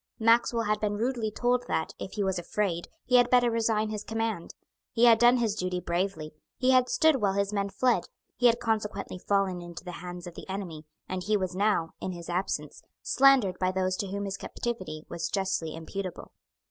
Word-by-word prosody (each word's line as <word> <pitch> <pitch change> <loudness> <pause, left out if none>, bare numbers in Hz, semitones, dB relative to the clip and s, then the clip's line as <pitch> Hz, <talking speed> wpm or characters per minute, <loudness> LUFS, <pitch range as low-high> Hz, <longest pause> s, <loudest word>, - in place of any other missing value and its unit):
Maxwell 230 +1 +3
had 210 -1 0
been 205 -1 -1
rudely 235 -1 -1
told 245 +3 0
that, 160 - -1
if 190 - -6
he 205 - -1
was 190 -2 0
afraid, 175 -1 -2 0.2
he 250 - +5
had 245 0 +4
better 245 -1 +4
resign 220 -1 +1
his 210 -1 -4
command. 225 -5 -3 0.4
He 240 0 +4
had 230 -2 +7
done 240 +1 +6
his 230 -4 +1
duty 185 -3 -2
bravely. 170 -3 -2 0.2
He 255 0 +3
had 255 -1 +4
stood 300 +3 +4
while 200 -2 +2
his 200 +1 0
men 200 -1 0
fled. 245 +4 +1 0.3
He 245 - +4
had 235 0 +3
consequently 215 -5 -2
fallen 195 -2 0
into 175 0 -9
the 180 - -5
hands 180 0 -7
of 175 - -8
the - - -11
enemy; 175 -6 -5 0.2
and 185 0 -3
he 210 +3 +1
was 185 -2 -3
now, 195 -5 +1
in 185 - -3
his 170 -1 -9
absence, 175 -5 -2 0.2
slandered 260 -9 +4
by 185 0 +1
those 185 0 0
to 200 - -2
whom 200 +1 -3
his 195 0 -4
captivity 185 -12 -5
was 170 - -4
justly 185 -5 -1
imputable. 185 +3 -6
200 Hz, 200 wpm, -28 LUFS, 180-230 Hz, 0.4 s, had